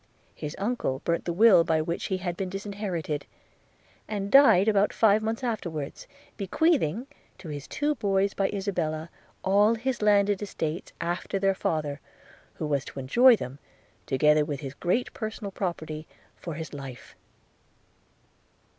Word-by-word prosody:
His 150 - -6
uncle 195 - -2
burnt 170 0 0
the 175 - -1
will 190 -1 +6
by 160 -1 +1
which 170 +2 -2
he 190 - -1
had 180 -2 -3
been 190 0 -3
disinherited, 195 -6 -4 0.8
and 200 -2 -3
died 270 -9 +7
about 205 -1 +3
five 215 -1 +4
months 225 +3 -2
afterwards, 170 - -4 0.3
bequeathing 235 - +1 0.3
to 170 - -10
his 145 -2 -6
two 295 +1 0
boys 200 -5 +1
by 195 -1 0
Isabella, 170 -5 -2 0.3
all 205 +4 +4
his 245 +1 -2
landed 205 -1 +3
estates, 165 -4 -4
after 175 +3 -2
their 195 0 +2
father, 155 -5 -2 0.6
who - - -4
was 140 -2 0
to - - -8
enjoy 240 - +6
them, 135 - -7 0.5
together 150 +3 +4
with 145 -1 -4
his 135 -2 -6
great 180 - -1
personal 220 -2 -5
property, 160 -5 -4 0.3
for 165 -3 -7
his 160 0 -7
life. 135 -3 -9
190 Hz, 145 wpm, -27 LUFS, 155-210 Hz, 0.8 s, died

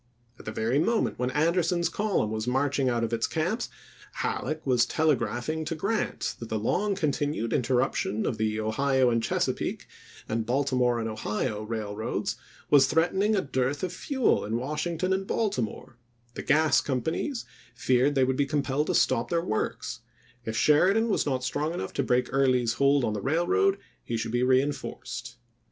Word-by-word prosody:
At - - -13
the 110 - -4
very 115 +5 0
moment 225 - +1
when 125 0 0
Anderson's 170 +4 +1
column 200 - 0
was 110 +1 -3
marching 135 +1 +1
out 120 -1 0
of 115 0 -2
its 115 0 +1
camps, 180 +9 -1 0.4
Halleck 155 0 -3
was 125 -3 +3
telegraph 140 -6 0
ing 160 0 -1
to 165 - -3
Grant 205 +7 -1
that 115 - -7
the 110 - -1
long 195 - 0
continued 145 - -1
interruption 125 -5 0
of 110 - -2
the 110 0 0
Ohio 130 +4 +2
and 115 0 +1
Chesapeake - - -1 0.4
and 115 +1 -1
Baltimore 125 -1 +1
and 115 - -2
Ohio 105 0 -2
Railroads 110 -1 -3 0.4
was 135 -2 +7
threatening 190 +8 +2
a 195 - +2
dearth 135 +2 -1
of 180 -1 -2
fuel 265 - +1
in 110 +2 -2
Washington 160 +7 -1
and 190 0 -2
Baltimore; 125 - -2 0.3
the - - -5
gas 155 +1 +3
companies 160 - -2 0.3
feared 130 +3 +2
they 135 - +4
would 130 0 +1
be 140 - +1
compelled 145 0 0
to - - 0
stop 115 - +2
their 170 0 0
works; 110 - -2 0.5
if 110 0 -3
Sheridan 190 - +4
was 200 - +1
not 130 -2 -1
strong 150 +5 -1
enough - - -4
to - - 0
break 125 -1 +1
Early's 130 -4 +2
hold 140 0 +3
on 110 - 0
the 105 - -3
railroad, 280 - +2 0.3
he 115 - -3
should 115 - -3
be 120 +1 +1
reenforced. 130 -2 -1
135 Hz, 170 wpm, -27 LUFS, 120-160 Hz, 0.5 s, was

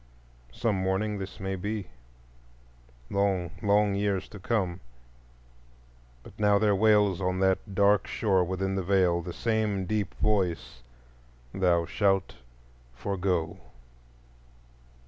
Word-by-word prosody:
Some 110 - -1
morning 95 +3 -1
this 95 0 -7
may 95 0 -3
be, 100 +1 -4 1.2
long, 95 -4 0
long 105 -1 +3
years 100 -1 -1
to 100 - -10
come. 95 -4 -1 1.4
But - - -13
now 105 -1 +4
there 105 -1 +3
wails, 105 -2 +3
on 90 0 -1
that 95 +1 0
dark 100 0 +3
shore 95 -4 +1
within 95 +2 -2
the 95 - -1
Veil, 90 -2 +2
the 85 - -6
same 105 -1 -1
deep 105 +1 -2
voice, 90 -11 -1 0.7
_Thou 85 -3 +2
shalt 95 0 +1 0.6
forego! 90 +2 -2
95 Hz, 110 wpm, -28 LUFS, 95-105 Hz, 1.4 s, now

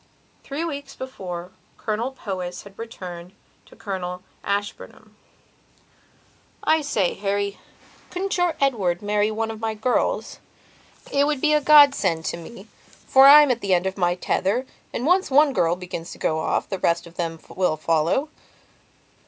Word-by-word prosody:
Three 295 +4 -4
weeks 285 -4 -6
before 180 -9 -7 0.3
Colonel 220 +3 -2
Powys 185 -8 -6
had 200 0 -15
written 180 -6 -8 0.3
to - - -17
Colonel 180 -3 -5 0.2
Ashburnham: 200 +1 -5 1.5
"I 315 0 +3
say, 210 -11 0
Harry, 200 0 -2 0.5
couldn't 385 +2 -2
your 355 -2 +1
Edward 205 -10 0
marry 205 +1 +1
one 220 +1 -2
of 220 - -8
my 220 -1 -2
girls? 250 - -1 0.7
It 280 +1 +3
would 300 -2 0
be 305 +2 +2
a 300 - +3
god 290 -1 +8
send 165 -9 -1
to - - -2
me, 190 +5 -11 0.4
for 270 +1 +7
I'm 295 -1 +9
at 240 -1 -1
the 190 -2 +2
end 175 +1 0
of 190 0 -2
my 175 -2 +1
tether 200 +7 0 0.3
and, 245 - -3
once 365 +4 +3
one 285 +1 +4
girl 170 -6 +2
begins 180 -2 -7
to - - -12
go 160 0 0
off, - - -1
the 195 - -4
rest 170 0 +1
of 170 - -13
them 165 -2 -3
will 180 -4 0
follow." 165 - +1
205 Hz, 160 wpm, -23 LUFS, 180-275 Hz, 1.5 s, I'm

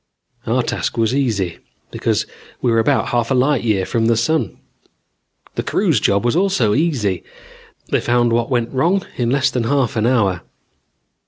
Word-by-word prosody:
Our - - +1
task - - -3
was 115 +1 +1
easy, 110 -11 -1 0.3
because - - -1 0.3
we 120 - +1
were 115 - +3
about 110 - +1
half 120 -1 0
a 135 - +2
light 130 0 +2
year 105 -5 +1
from 115 +2 0
the 115 -1 +3
sun. 120 - 0 1.0
The - - -2
crew's - - +1
job 100 +3 +1
was 120 - +1
also 170 - +2
easy: 120 - 0 0.7
they - - +2
found 120 -1 +2
what 115 0 0
went 120 -2 -1
wrong 175 +9 +1
in 120 -2 0
less 135 +1 +2
than 125 -2 -1
half 135 -2 +1
an 110 +1 +1
hour. 100 -8 +1
120 Hz, 170 wpm, -19 LUFS, 110-135 Hz, 1.0 s, were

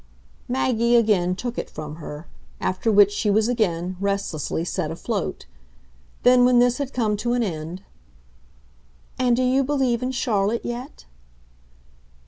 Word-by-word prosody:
Maggie 240 -2 +1
again 200 -6 +3
took 240 +4 -4
it - - -5
from 155 0 -8
her; 150 0 -8 0.3
after 185 +5 0
which 205 -1 +6
she 205 +1 -1
was 215 +2 +3
again, 185 -7 -1
restlessly, 195 -5 -2
set - - -2
afloat. - - -4 0.8
Then 250 0 +6
when 250 0 +5
this 245 +2 +3
had 280 -2 -3
come 220 -4 0
to 240 +3 -1
an 245 -1 +1
end: 170 -1 -5 1.4
"And 250 -2 +3
do 255 - +1
you 260 +2 +3
believe 260 -4 0
in 255 - -1
Charlotte 230 -3 0
yet?" 240 +3 -6
225 Hz, 140 wpm, -23 LUFS, 190-245 Hz, 1.4 s, which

